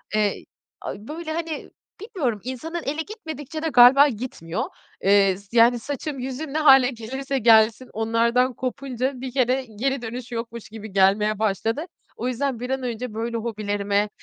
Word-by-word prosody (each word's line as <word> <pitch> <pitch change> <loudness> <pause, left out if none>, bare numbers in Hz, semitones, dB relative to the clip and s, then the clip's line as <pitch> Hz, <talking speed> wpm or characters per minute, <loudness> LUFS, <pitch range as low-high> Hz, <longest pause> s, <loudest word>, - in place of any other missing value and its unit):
eee, 210 -1 0 0.4
a, - - -4
böyle 315 +1 -5
hani, 330 -1 -4 0.3
bilmiyorum 325 - -2
insanın 315 +7 -5
eli 300 +3 -2
gitmedikçe 315 - -7
de 325 - -1
galiba 265 +2 +8
gitmiyor. 215 - -4 0.4
Eee, 195 -1 +4
s 200 +4 -7
yani 235 +1 +6
saçım, 285 +3 -5
yüzüm 265 +3 -5
ne - - 0
hâle 270 -5 +7
gelirse 265 +3 -4
gelsin, 225 +1 +4
onlardan 235 +3 +2
kopunca 255 +1 -3
bir 260 -1 -5
kere, 260 0 +1
geri 270 +1 0
dönüş 240 +1 -6
yokmuş 230 -1 -6
gibi 220 -1 -9
gelmeye 200 +2 +3
başladı. 220 - 0 0.3
O 245 - -3
yüzden 255 0 -1
bir 250 +1 -5
an 265 -1 -2
önce 240 -1 -4
böyle 230 +1 -3
hobilerime, 205 -2 -1
245 Hz, 155 wpm, -23 LUFS, 220-275 Hz, 0.4 s, galiba